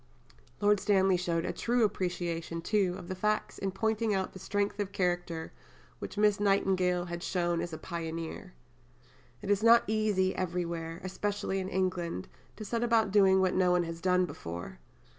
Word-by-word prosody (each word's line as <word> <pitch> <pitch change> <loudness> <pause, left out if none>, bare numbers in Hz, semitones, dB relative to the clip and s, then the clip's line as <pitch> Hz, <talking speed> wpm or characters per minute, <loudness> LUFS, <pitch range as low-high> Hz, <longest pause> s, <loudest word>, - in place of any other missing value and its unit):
Lord 205 0 +4
Stanley 190 -2 +3
showed 170 -2 -1
a - - -2
true 240 0 +1
appreciation, 170 -4 -2
too, 195 -2 +1
of 175 - -9
the - - -3
facts 210 +3 -1
in 195 - -1
pointing 220 +2 0
out 190 -1 -2
the 190 - -9
strength 205 +2 -1
of 200 -1 -2
character 175 -4 -2 0.5
which 190 - -7
Miss 210 -1 +3
Nightingale 185 -3 +2
had 170 0 -5
shown 175 -2 0
as 175 0 -4
a 160 - -5
pioneer. 165 +2 -6 0.9
"It 205 - -1
is 205 0 +2
not 235 +1 +7
easy 210 -3 +1
everywhere, 170 -1 -3
especially 195 +1 -2
in 190 0 -3
England, 180 - -2 0.3
to 215 - -8
set 230 +3 -2
about 230 -4 +2
doing 190 -2 +5
what 185 -1 +2
no 185 -1 +3
one 180 0 +3
has 165 0 -6
done 180 0 +3
before. 85 - -7
185 Hz, 170 wpm, -30 LUFS, 175-205 Hz, 0.9 s, not